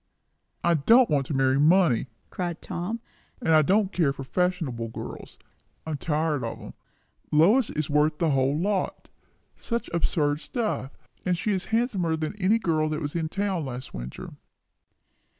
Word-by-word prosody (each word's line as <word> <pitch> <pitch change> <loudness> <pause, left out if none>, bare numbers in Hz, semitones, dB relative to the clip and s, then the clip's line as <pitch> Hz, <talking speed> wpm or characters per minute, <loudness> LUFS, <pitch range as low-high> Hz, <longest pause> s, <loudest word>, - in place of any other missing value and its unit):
"I 170 - +4
don't 225 - +5
want 140 -3 +1
to 150 - -2
marry 135 0 +3
money!" 155 -5 +4 0.2
cried 175 -2 -3
Tom; 210 +7 -4 0.4
"and 165 -10 +1
I 155 - +7
don't 195 +5 +2
care 160 -6 +2
for 135 -1 -7
fashionable 160 -7 -1
girls. 115 - -8 0.5
I'm 155 -2 -3
tired 150 -2 -1
of 115 - -4
'em. - - -10 0.6
Lois 200 - +5
is 155 -1 -2
worth 150 +1 +2
the 165 -1 +1
whole 135 +1 +2
lot. 195 +1 -2 0.5
Such 235 -5 -3
absurd 150 -3 +1
stuff! 215 - -3 0.3
And 180 -1 0
she 210 - -1
is 190 -2 -1
handsomer 215 -8 0
than 155 +4 -3
any 200 +5 +4
girl 155 -7 0
that 155 -1 -2
was 145 -1 -4
in 160 -2 -1
town 195 -2 -1
last 130 -1 -7
winter." - - -7
160 Hz, 160 wpm, -26 LUFS, 145-190 Hz, 0.6 s, I